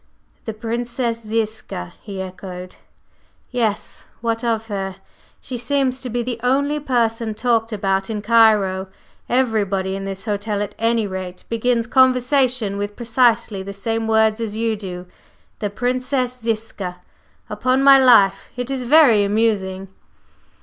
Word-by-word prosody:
"The 220 - -3
Princess 235 +1 -3
Ziska," 215 - -3
he 195 -3 -6
echoed, 185 -1 -9 0.7
"Yes? 225 -5 -2 0.2
What 230 0 -2
of 225 -2 0
her? 195 -3 -4 0.4
She 255 - -6
seems 265 0 0
to 255 - -4
be 240 +1 -1
the 240 -1 -4
only 280 +4 +1
person 230 -5 0
talked 230 0 +1
about 195 -1 -1
in 210 -2 -3
Cairo. 210 -4 +4 0.4
Everybody 205 -6 +1
in 195 - -5
this 195 +1 -5
hotel, 205 -1 -1
at 205 - -7
any 230 -1 +1
rate, 185 -2 -6
begins 230 0 +1
conversation 255 -4 +2
with 205 0 -4
precisely 235 -4 +1
the 200 +1 -7
same 225 +3 -2
words 220 0 +3
as 215 -2 -3
you 225 0 0
do, 180 -3 -7 0.5
'the 205 - -2
Princess 250 +3 -1
Ziska!' 215 -5 -3 0.5
Upon 255 +1 +1
my 275 0 +8
life, 230 -7 +5
it 250 +1 -3
is 265 -1 -2
very 250 -5 +5
amusing!" 200 -3 0
225 Hz, 135 wpm, -20 LUFS, 200-245 Hz, 0.7 s, my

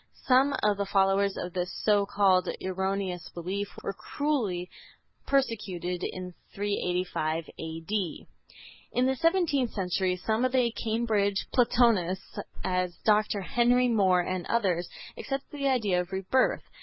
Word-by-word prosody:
Some 270 +2 +4
of 210 -1 +3
the 200 - -1
followers 195 0 +2
of 180 -1 -5
this 180 0 -2
so 205 -2 +4
called 190 -3 +3
erroneous 190 -1 -2
belief 190 +4 -3 0.2
were 195 - -2
cruelly 215 -9 -2 0.6
persecuted 195 -10 -1
in 180 -1 -5 0.2
385 180 -5 -1
A.D. 165 +3 -3 0.7
In 250 - +2
the 265 0 +2
seventeenth 330 -5 +2
century 185 -1 0
some 220 +6 -1
of 255 0 +1
the 250 -3 +3
Cambridge 220 -4 0
Platonists, 225 -7 +2 0.2
as 180 -1 -1
Dr. 210 -1 +3
Henry 245 +6 +3
More 190 -5 +4
and 185 0 -3
others, 185 -7 0 0.3
accepted 270 0 -4
the 280 -1 -1
idea 210 -9 +2
of 180 +1 -9
rebirth. 195 +7 +1
200 Hz, 130 wpm, -28 LUFS, 180-235 Hz, 0.7 s, Some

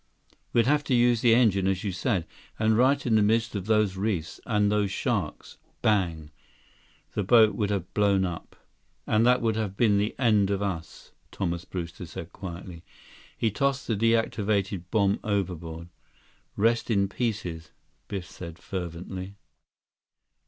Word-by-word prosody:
"We'd 115 -1 +3
have 145 +3 +2
to 130 - +2
use 120 -1 +3
the 115 -2 +5
engine, 100 -6 +3
as 95 -1 0
you 100 - -1
said. 95 -1 -1 0.3
And 110 0 +2
right 135 +4 +3
in 120 - +1
the 110 - +5
midst 115 +2 +2
of 100 -2 -4
those 105 -3 +2
reefs, 95 -5 -2
and 105 -2 +2
those 105 -1 +1
sharks, 100 - -3 0.2
bang! 85 -8 +1 0.8
The - - -1
boat 110 +2 +5
would 105 -3 -1
have 95 -3 -3
blown 100 -2 +3
up—" 85 -2 -6 0.5
"And 110 +2 +3
that 125 0 +4
would 110 -1 +1
have 100 -3 -3
been 105 -4 +4
the 105 +2 -1
end 105 -6 +3
of 100 -1 0
us," 95 -5 -5 0.2
Thomas 85 -2 -3
Brewster 85 -1 -6
said 85 +1 -8
quietly. 90 -2 -8 0.5
He 110 - +1
tossed 140 +5 0
the 115 - 0
deactivated 105 -4 +1
bomb 100 -2 +2
overboard. 85 -5 -3 0.7
"Rest 115 +3 +2
in 100 -3 +2
pieces," 95 -7 -3 0.4
Biff 95 -3 -5
said 85 -3 -9
fervently. 90 +1 -6
100 Hz, 150 wpm, -27 LUFS, 90-110 Hz, 0.8 s, the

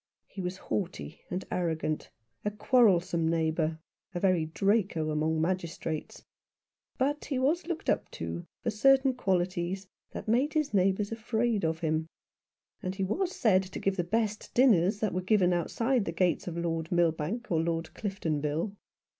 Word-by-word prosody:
He 195 - -8
was 180 +1 -3
haughty 180 -5 -4
and 180 +1 -3
arrogant, 160 -3 -1 0.3
a 210 - +1
quarrelsome 185 -7 +3
neighbour, 160 -1 0 0.4
a - - 0
very 180 -4 +3
Draco 190 -3 +1
among 155 +1 +1
magistrates; 165 -2 -3 0.7
but 290 +3 0
he 275 - -2
was 305 +7 +1
looked 345 -2 -4
up - - +1
to 85 +1 -5 0.2
for - - 0
certain 265 +4 +4
qualities 185 -3 -1 0.2
that - - -7
made 255 +7 +2
his 305 -6 +1
neighbours 195 +2 +2
afraid 225 -1 0
of 160 0 0
him; 160 0 0 0.7
and 185 +1 -3
he 195 - -1
was 360 - -1
said 195 -5 +4
to 185 -1 -7
give 195 0 0
the 175 - 0
best 215 +3 -1
dinners 210 -6 +4
that 215 - 0
were 185 - 0
given 185 -2 +3
outside 230 +7 +1
the - - -2
gates 180 +1 +1
of 170 -1 -4
Lord 165 -1 -2
Milbank 175 +7 0
or 160 -2 +3
Lord 165 0 -2
Cliftonville. 160 -3 -2
185 Hz, 155 wpm, -30 LUFS, 165-220 Hz, 0.7 s, certain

